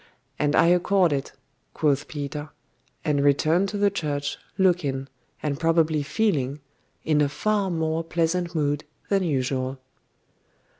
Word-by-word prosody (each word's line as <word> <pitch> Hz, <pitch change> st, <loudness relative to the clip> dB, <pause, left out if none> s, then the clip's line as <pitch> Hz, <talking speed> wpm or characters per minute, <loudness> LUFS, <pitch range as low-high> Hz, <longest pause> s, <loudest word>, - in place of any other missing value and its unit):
'And 150 Hz, 0 st, +2 dB
I -, -, +5 dB
accord 180 Hz, -1 st, +3 dB
it,' 135 Hz, -1 st, -3 dB, 0.4 s
quoth 145 Hz, -2 st, +1 dB
Peter; 145 Hz, 0 st, -5 dB, 0.6 s
and 145 Hz, -2 st, +2 dB
returned 155 Hz, +7 st, +3 dB
to 205 Hz, -, -4 dB
the 200 Hz, 0 st, +3 dB
church, 145 Hz, -6 st, -3 dB, 0.2 s
looking, 155 Hz, -8 st, +1 dB, 0.4 s
and 145 Hz, -2 st, -1 dB
probably 165 Hz, -2 st, +2 dB
feeling, 145 Hz, -, 0 dB, 0.4 s
in 155 Hz, -1 st, +2 dB
a 145 Hz, -, +2 dB
far 205 Hz, +5 st, 0 dB
more 160 Hz, -1 st, -1 dB
pleasant 170 Hz, +1 st, -1 dB
mood 145 Hz, -1 st, 0 dB, 0.3 s
than 195 Hz, -1 st, +3 dB
usual. 130 Hz, -4 st, -1 dB
155 Hz, 130 wpm, -25 LUFS, 145-175 Hz, 0.6 s, I